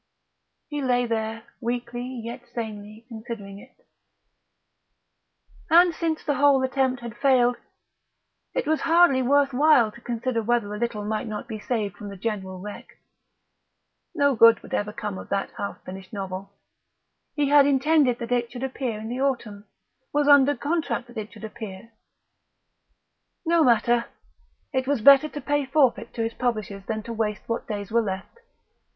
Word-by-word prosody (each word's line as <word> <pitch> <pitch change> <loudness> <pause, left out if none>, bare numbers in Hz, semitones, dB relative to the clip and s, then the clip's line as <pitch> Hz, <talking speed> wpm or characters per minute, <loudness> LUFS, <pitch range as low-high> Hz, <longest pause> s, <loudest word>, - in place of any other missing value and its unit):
He 295 -1 -4
lay 245 -2 +2
there, 225 -1 -3 0.2
weakly 240 0 -3
yet 245 -1 -7
sanely 215 -1 -7
considering 220 -4 -8
it.... 380 - -19 1.8
And 345 +1 +6
since 320 -1 -2
the 290 - 0
whole 280 -1 +4
attempt 260 -1 0
had 235 -1 -7
failed, 245 -2 +3 1.0
it - - 0
was 315 0 +1
hardly 335 -5 +4
worth 275 +1 +3
while 265 -5 +4
to 235 - -15
consider 240 0 -2
whether 225 -2 0
a 210 - -5
little 225 -3 -2
might 220 +3 -2
not 210 -1 -5
be 220 -2 -6
saved 210 -4 -2
from 205 - -8
the 200 - -9
general 190 -2 -4
wreck. 205 +2 -10 1.2
No 285 -3 +3
good 230 -1 +6
would - - -11
ever 205 0 -1
come 210 -2 -5
of - - -10
that 195 0 -1
half 200 - -5
finished 190 0 -9
novel. 195 -1 -6 0.8
He 290 -2 +1
had 285 -1 +6
intended 280 -2 +3
that 235 0 -6
it 240 -1 0
should 245 0 -7
appear 255 -4 -3
in 220 - -7
the 250 +3 -4
autumn; 235 -7 -2 0.5
was 295 0 +1
under 285 0 +6
contract 295 -5 -2
that 240 - -12
it 215 +1 -7
should 215 -1 -14
appear; 220 -1 -8 1.5
no 335 0 +4
matter; 235 -1 +3 0.7
it 260 -1 0
was 285 -2 +1
better 275 +6 +7
to 295 - -7
pay 290 0 0
forfeit 270 -2 +2
to 230 - -1
his 225 0 -2
publishers 215 -5 -3
than 220 -1 -3
to 230 - -6
waste 215 -2 -2
what 230 - -3
days 205 -2 -5
were 235 +1 +3
left. 195 - -5
240 Hz, 160 wpm, -25 LUFS, 215-275 Hz, 1.8 s, better